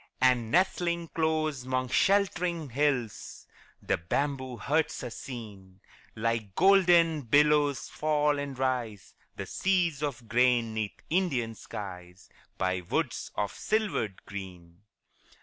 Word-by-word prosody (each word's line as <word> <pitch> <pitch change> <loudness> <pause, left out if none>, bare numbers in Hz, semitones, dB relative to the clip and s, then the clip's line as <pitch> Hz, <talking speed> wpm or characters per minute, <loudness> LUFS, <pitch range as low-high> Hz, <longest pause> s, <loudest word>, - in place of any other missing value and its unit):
And 125 -3 +3
nestling 170 0 +1
close 155 -4 0
'mong 130 0 -1
shelt'ring 175 -5 +1
hills 130 -4 -1 0.4
The - - +1
bamboo 130 - -2
huts 150 +7 0
are 125 - -5
seen; 100 -8 -9 0.4
Like 110 -3 -2
golden 175 -4 +5
billows 145 +2 +3
fall 150 -1 +1
and 140 -2 -5
rise 125 -6 -2 0.2
The - - -5
seas 175 -6 0
of 140 -6 -4
grain 120 -1 +3
'neath 110 -2 -4
Indian 140 -11 +1
skies, 90 -4 -9 0.3
By 95 0 0
woods 85 - -2
of 105 - -2
silvered 205 - -2
green. 90 -3 -9
130 Hz, 115 wpm, -29 LUFS, 110-160 Hz, 0.4 s, golden